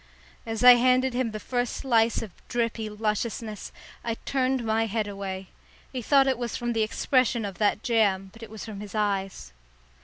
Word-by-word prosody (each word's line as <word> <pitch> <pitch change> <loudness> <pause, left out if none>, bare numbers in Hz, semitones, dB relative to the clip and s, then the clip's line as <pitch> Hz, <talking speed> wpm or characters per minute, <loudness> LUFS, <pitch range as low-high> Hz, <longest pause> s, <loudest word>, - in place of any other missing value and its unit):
As 225 +1 -3
I 250 -1 +10
handed 255 +1 +3
him 250 -1 0
the 215 -1 -6
first 245 +1 -2
slice 230 -3 +2
of 215 - -8 0.2
drippy 230 -2 -1
lusciousness, 215 0 -3 0.3
I 230 -1 -2
turned 260 -2 0
my 225 0 +1
head 215 0 -1
away. 195 -2 -6 0.4
He 255 - -3
thought 275 +3 +4
it 260 -3 0
was 240 -2 -3
from 240 0 -2
the 225 - +1
expression 240 +1 +1
of 195 -2 -7
that 210 0 +1
jam, 200 -6 +1
but 225 - -15
it 225 - -9
was 220 0 -8
from 215 -3 -7
his 205 +1 -8
eyes. 195 - -2
225 Hz, 185 wpm, -26 LUFS, 210-245 Hz, 0.4 s, I